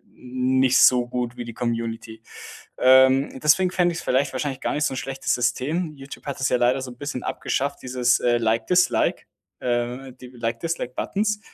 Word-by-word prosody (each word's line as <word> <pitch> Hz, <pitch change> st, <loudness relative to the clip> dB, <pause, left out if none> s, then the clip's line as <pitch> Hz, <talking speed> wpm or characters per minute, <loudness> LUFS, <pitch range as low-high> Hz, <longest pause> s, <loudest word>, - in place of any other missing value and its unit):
nicht 130 Hz, +1 st, +1 dB
so 125 Hz, -1 st, +5 dB
gut 125 Hz, -1 st, -3 dB
wie 120 Hz, -, -6 dB
die 120 Hz, -1 st, -8 dB
Community. 115 Hz, -1 st, -4 dB, 0.6 s
Ähm, 130 Hz, +1 st, +4 dB
deswegen 180 Hz, +5 st, +3 dB
fände 175 Hz, -2 st, +1 dB
ich's 165 Hz, -, -6 dB
vielleicht 135 Hz, +2 st, +1 dB
wahrscheinlich 135 Hz, 0 st, -3 dB
gar -, -, -1 dB
nicht 150 Hz, -, -1 dB
so 145 Hz, -, 0 dB
'n -, -, -5 dB
schlechtes 135 Hz, +1 st, -2 dB
System. 145 Hz, +7 st, -1 dB
Youtube 135 Hz, 0 st, -11 dB
hat 140 Hz, -, -4 dB
es 130 Hz, -, +1 dB
ja 125 Hz, -, +2 dB
leider 125 Hz, +2 st, +2 dB
so 130 Hz, -1 st, -7 dB
'n 125 Hz, -, -14 dB
bisschen 145 Hz, -3 st, -5 dB
abgeschafft, 140 Hz, +1 st, -2 dB
dieses, 125 Hz, -1 st, +1 dB
äh, 120 Hz, -1 st, +2 dB
Like-Dislike 115 Hz, +11 st, +1 dB, 0.4 s
äh, 125 Hz, +2 st, -2 dB
die 125 Hz, -, -9 dB
Like-Dislike-Buttons. 130 Hz, -, -3 dB
130 Hz, 170 wpm, -23 LUFS, 120-140 Hz, 0.6 s, so